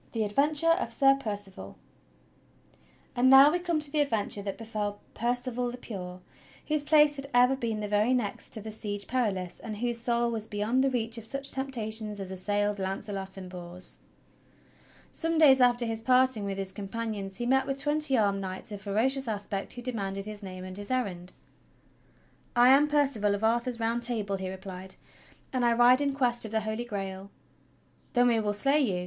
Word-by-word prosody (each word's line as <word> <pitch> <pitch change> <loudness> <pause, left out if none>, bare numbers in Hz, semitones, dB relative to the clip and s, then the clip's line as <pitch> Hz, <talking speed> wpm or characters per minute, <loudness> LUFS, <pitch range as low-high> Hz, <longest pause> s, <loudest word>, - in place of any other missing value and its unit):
THE 225 -2 0
ADVENTURE 295 +9 +3
OF - - -3
SIR 270 -1 +5
PERCIVAL 205 -5 -7 1.4
And 255 +1 +4
now 270 +2 +9
we 355 - 0
come 345 -3 -1
to 295 -1 -4
the 305 - 0
adventure 220 -7 0
that 200 -1 -5
befell 210 -2 -4
Percival 245 +1 -1
the 245 - -7
Pure 185 -6 -8 0.5
whose 305 -1 +1
place 295 0 +4
had 275 0 -7
ever 250 +2 +5
been 225 -4 -3
the 210 - -3
very 210 +5 +2
next 220 -5 -3
to 220 - -1
the 220 +1 -7
Siege 205 -2 -3
Perilous, 200 -8 -2
and 215 -2 -7
whose 240 +1 +1
soul 235 0 +1
was 220 -1 -4
beyond 215 +5 0
the 270 - +3
reach 230 -2 -2
of - - -11
such 275 +4 -2
temptations 220 -6 -3
as 190 -1 -6
assailed 205 +2 -1
Launcelot 195 0 -4
and 185 -1 -7
Bors. 180 0 -2 1.1
Some 330 0 -1
days 275 -4 +6
after 245 -1 +4
his 225 -1 -2
parting 255 -3 +3
with 195 -1 -3
his 195 -1 -2
companions 205 -1 -5
he 240 - -3
met 265 +2 +2
with 275 0 -2
twenty 295 -1 +2
armed 200 -2 +1
knights 190 +3 -6
of 205 -1 -7
ferocious 245 +7 0
aspect 205 -2 -4
who 245 - -8
demanded 195 -5 -3
his 210 0 -8
name 185 -2 -8
and 185 0 -6
his 205 0 -8
errand. 190 -9 -2 1.2
"I 240 +1 +6
am 280 +3 +6
Percival 270 -9 +1
of 205 - -6
Arthur's 235 +2 0
Round 230 +1 0
Table," 215 -5 -2
he 190 -1 -5
replied, 190 0 -8 0.6
"and 255 -1 0
I 235 -1 +4
ride 245 +3 +5
in 280 -1 0
Quest 245 -3 +1
of 220 - -3
the 220 +1 -1
Holy 220 +2 -3
Grail." 195 -3 -6 0.8
"Then 245 0 +4
we 230 -1 +2
will 210 -1 -1
slay 275 +8 +3
you!" 200 -11 0
225 Hz, 190 wpm, -28 LUFS, 200-255 Hz, 1.4 s, now